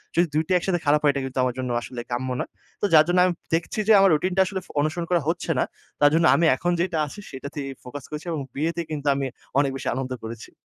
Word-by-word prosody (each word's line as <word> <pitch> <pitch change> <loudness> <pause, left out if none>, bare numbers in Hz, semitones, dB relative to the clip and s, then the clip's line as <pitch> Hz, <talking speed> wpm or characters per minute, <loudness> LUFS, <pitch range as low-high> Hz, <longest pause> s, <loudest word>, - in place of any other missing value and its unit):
যদি 175 +1 +4
২ 155 +1 +2
টা 185 - +1
একসাথে 175 0 0
খারাপ 150 +1 +4
হয়, 145 - +5
এটা 140 - -2
কিন্তু 130 0 -4
আমার 125 -1 0
জন্য 130 -1 -2
আসলে 120 0 -6
কাম্য 130 +2 -2
না। - - -2 0.4
তো - - +2
যার 155 -1 +8
জন্য 175 +1 +3
আমি 180 - +1 0.2
দেখছি 170 +5 -3
যে 220 - +7
আমার 195 - +6
রুটিনটা 185 +5 +2
আসলে 190 0 -4
ফ - - -22
অনুসরণ 170 +3 -1
করা 175 - +3
হচ্ছে 170 0 -1
না। - - +4 0.4
তার 145 - +7
জন্য 165 +1 +4
আমি 170 - +3
এখন 175 +6 -1
যেইটা 170 -2 0
আছে, 145 - -10
সেটাতেই 140 +1 -6 0.2
ফোকাস 130 +2 -8
করেছি 150 +2 -6
এবং 155 -3 -2
বিয়েতে 165 +4 -1
কিন্তু 145 -1 -4
আমি 135 0 -1 0.3
অনেক 140 -1 +2
বেশি 135 - -5
আনন্দ 130 0 -3
করেছি। 115 0 -8
155 Hz, 250 wpm, -24 LUFS, 135-175 Hz, 0.4 s, যার